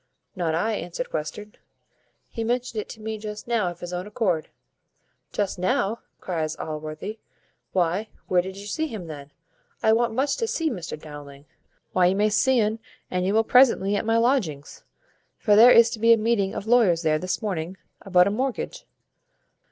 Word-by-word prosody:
"Not 170 -4 -1
I," 215 +7 0
answered 190 +5 -5
Western, 160 +8 -5 0.7
"he 230 - -5
mentioned 240 -1 -1
it - - -12
to - - -9
me 220 0 -5
just 210 +1 -7
now 225 -6 +1
of 175 0 -10
his 175 0 -6
own 180 +2 -4
accord." 195 -7 -1 0.8
"Just 200 -3 -2
now!" 195 +4 0 0.2
cries 160 -4 -3
Allworthy, 155 +7 -6 0.5
"why, 185 +4 0 0.2
where 180 -1 +3
did 190 +2 -8
you 200 - -9
see 315 +9 -2
him 215 - -7
then? 145 -3 -9 0.5
I 220 - +5
want 230 0 +1
much 275 +2 +1
to 455 - -1
see 325 -7 -1
Mr 175 -6 -6
Dowling." 145 -2 -11 0.5
"Why, 180 -1 +4
you 185 - +2
may 210 +2 +2
see 250 +5 +3
un 220 +1 0 0.3
an 180 0 0
you 195 +3 +1
will 225 - +4
presently 230 -5 +4
at - - 0
my 225 +1 +2
lodgings; 230 - 0 0.5
for 210 -2 +3
there 230 +4 +9
is 230 -1 +7
to 230 - -5
be 230 +1 +5
a - - +4
meeting 215 -3 0
of - - -4
lawyers 220 -8 +4
there 155 -1 +2
this 185 +6 -3
morning 185 -3 -3 0.3
about 180 -2 +4
a 200 - +1
mortgage. 255 +4 -3
205 Hz, 185 wpm, -25 LUFS, 175-225 Hz, 0.8 s, there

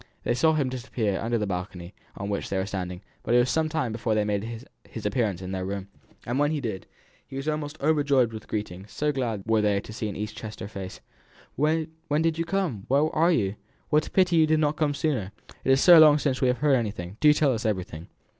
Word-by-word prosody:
They - - +1
saw 160 +6 +3
him 145 -4 +1
disappear 120 -5 -2
under 115 +1 0
the 105 - -1
balcony 90 -1 -5 0.2
on 100 - -4
which 100 -1 -3
they 95 - -1
were 95 - 0
standing, 90 -2 -5 0.2
but 120 - 0
it - - +7
was 125 +1 +3
some 160 -1 +1
time 155 -7 -1
before 110 0 -1
he 105 - +2
made 110 +3 -3 0.3
his 110 - -8
appearance 105 -5 0
in 90 - -5
their 95 -1 -3
room. 100 +1 -5 0.4
And 120 +3 -1
when 145 0 +3
he 155 -1 -1
did, 110 -8 -5 0.4
he - - -10
was 135 +2 -4
almost 150 0 -3
overpowered 140 -5 +2
with 110 - -8
greetings; 105 -2 -5
so 150 0 0
glad 120 -7 -2
were 110 -1 +2
they 105 -1 +2
to 110 - -10
see 110 -1 -3
an 100 - -6
East 105 +1 -5
Chester 110 -3 -7
face. 95 -2 -8 0.5
"When 155 +3 +1 0.3
did 165 0 +1
you 165 - 0
come? 175 - -2
Where 145 +4 +2
are 165 +3 +4
you? 105 - 0 0.3
What 150 0 +3
a - - -7
pity 180 -3 +3
you 160 -1 +5
did 155 0 +3
not 150 -1 +1
come 150 -2 0
sooner! 125 -11 -1 0.3
It - - -2
is 135 +1 +4
so 175 -2 +9
long 150 -2 +8
since 140 -3 -1
we 130 - +3
have 125 0 +2
heard 145 -2 +3
anything; 100 -5 -4
do 150 - +6
tell 150 -2 +3
us 115 - -3
everything! 90 -6 -3
120 Hz, 240 wpm, -26 LUFS, 100-150 Hz, 0.5 s, so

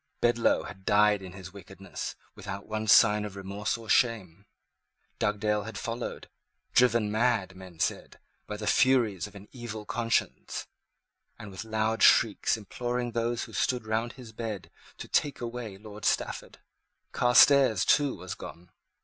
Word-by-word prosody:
Bedloe 120 -1 +2
had 95 - -10
died 105 0 +3
in 95 -2 -9
his 95 -1 -10
wickedness, 95 0 -8 0.2
without 100 0 -7
one 110 0 -4
sign 105 -1 +6
of 105 -2 -7
remorse 100 +3 -3
or 115 -1 -12
shame. 100 -6 +1 0.7
Dugdale 105 0 0
had 105 0 -7
followed, 115 +2 -5 0.5
driven 120 -4 +3
mad, 110 -5 +1
men 95 -3 -13
said, - - -2 0.3
by 105 - -5
the 105 - -6
Furies 115 -7 +2
of 105 - -17
an 100 +1 -12
evil 115 -4 -7
conscience, 115 +1 -2 0.7
and 105 - -10
with 95 +3 -7
loud 110 0 -1
shrieks 110 0 +4
imploring 120 +3 -3
those 115 +1 -1
who - - -10
stood 125 -3 0
round 110 +2 -1
his 125 -4 -12
bed 110 -4 -6 0.3
to - - -8
take 145 -2 0
away 115 -4 -6
Lord 105 +1 -11
Stafford. - - -1 0.5
Carstairs, 125 -3 +5
too, 145 -2 +3
was 90 0 -7
gone. 85 +1 -11
110 Hz, 150 wpm, -28 LUFS, 100-120 Hz, 0.7 s, sign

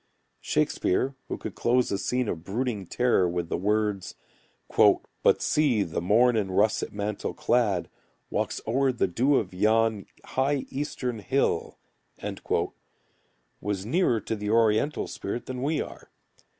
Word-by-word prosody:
Shakespeare, 130 +9 0
who - - -3
could - - -6
close 125 +1 +1
a 100 - 0
scene 125 -1 0
of 80 -5 -3
brooding 105 -1 -2
terror 120 -7 +2
with 85 -1 -3
the - - 0
words: 105 -1 0 0.6
"But - - +3
see, 135 -9 +2
the 85 -1 -3
morn 115 +7 +4
in 105 -3 0
russet 100 +4 +1
mantle 105 0 -3
clad, 105 -7 +1 0.4
Walks - - -1
o'er 130 +4 +2
the 120 -5 0
dew 125 +10 +2
of 95 -7 0
yon 110 +2 +2 0.2
high 135 +1 0
eastern 130 -4 -3
hill" 100 -3 0 1.8
was 100 -2 -2
nearer 125 - +2
to 110 - -3
the 105 -1 -4
oriental 115 +5 +2
spirit 115 +4 -5
than 125 -1 -5
we 150 +3 0
are. - - -12
110 Hz, 135 wpm, -27 LUFS, 100-125 Hz, 1.8 s, morn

